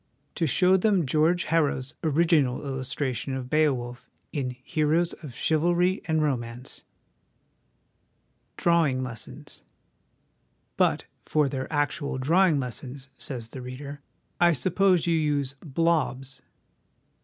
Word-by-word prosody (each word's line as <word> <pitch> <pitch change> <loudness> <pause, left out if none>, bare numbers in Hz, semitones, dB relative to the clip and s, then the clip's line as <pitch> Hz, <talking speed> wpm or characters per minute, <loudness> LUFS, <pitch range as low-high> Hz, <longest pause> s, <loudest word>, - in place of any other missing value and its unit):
To 165 - 0
show 185 +6 +4
them 190 -4 +2
George 160 +6 +2
Harrow's 145 -4 0
'original 155 -4 +2
illustration' 130 0 -2
of 130 -1 -6
Beowulf 130 -6 0 0.2
in 135 -4 -1
Heroes 155 +4 +1
of 135 -7 -10
Chivalry 175 +6 +2
and 160 -1 +1
Romance? 125 -3 -3 1.7
Drawing 160 -7 +2
Lessons. 120 -3 -7 1.1
But - - +2 0.2
'for 150 -2 +1
their 135 +1 -4
actual 145 -1 -1
draw 165 +9 +4
ing 155 -5 +2
lessons/ 130 +2 -5
says 120 -5 -5
the 130 - -8
reader, 140 +3 -8 0.2
' - - -24
I 175 -1 +6
suppose 180 +5 +2
you 170 - +2
use 145 -4 0
" - - -39
blobs 135 -4 -1
145 Hz, 120 wpm, -26 LUFS, 130-165 Hz, 1.7 s, I